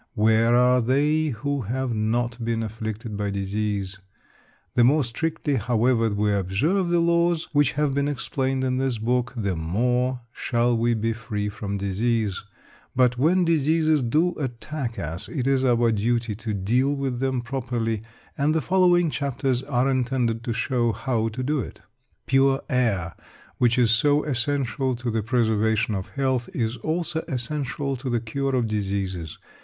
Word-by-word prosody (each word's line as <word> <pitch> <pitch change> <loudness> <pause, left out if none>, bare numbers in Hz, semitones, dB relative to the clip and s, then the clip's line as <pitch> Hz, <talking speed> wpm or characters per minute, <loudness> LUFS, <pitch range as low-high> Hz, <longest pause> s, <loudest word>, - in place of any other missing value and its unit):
Where 110 +2 +4
are 125 +1 +4
they 150 +6 +2
who 140 +2 -2
have 125 +3 -2
not 115 +2 -1
been 115 0 -1
afflicted 110 0 -5
by 100 0 -2
disease? 100 0 -2 0.7
The 120 - +4
more 145 +5 +4
strictly, 145 +3 -2
however, 115 +1 +2
we 105 0 +1
observe 120 - +1
the 175 - +3
laws 170 0 +2
which 145 -2 +3
have 150 -1 0
been 140 +1 +1
explained 135 -1 -1
in 130 0 0
this 130 -3 0
book, 125 +2 0
the 100 -5 -1
more 125 +10 0
shall 120 0 0
we 115 +1 +2
be 115 +1 0
free 110 -2 -3
from 100 -1 -4
disease. 105 +1 -1 0.5
But 125 -1 +3
when 175 +6 +3
diseases 155 -1 +2
do 155 +9 +2
attack 130 -1 -4
us, 85 +6 -5
it 135 -7 -3
is 135 -1 +2
our 120 -2 +3
duty 115 +1 0
to 110 +2 -5
deal 120 +8 +1
with 135 -3 -2
them 130 -1 0
properly, 115 -3 -2 0.3
and 150 +2 +1
the - - +3
following 175 -2 +3
chapters 135 -3 -1
are 130 -2 0
intended 125 -3 0
to 120 - -1
show 120 0 0
how 115 0 -1
to 115 +3 -4
do 150 +3 0
it. - - -7 0.4
Pure 135 +1 +3
air, 105 -10 +1 0.5
which 120 -1 +3
is 120 -3 +4
so 145 +6 +3
essential 135 -1 -1
to 120 0 -3
the 110 0 0
preservation 110 -1 +1
of 95 -2 -4
health, 130 -3 0
is 115 -3 -1
also 160 0 -2
essential 140 +1 -3
to 130 +1 -5
the 120 -1 +1
cure 135 +4 -2
of 125 -2 +1
diseases. 95 -6 -3
120 Hz, 160 wpm, -24 LUFS, 110-135 Hz, 0.7 s, Where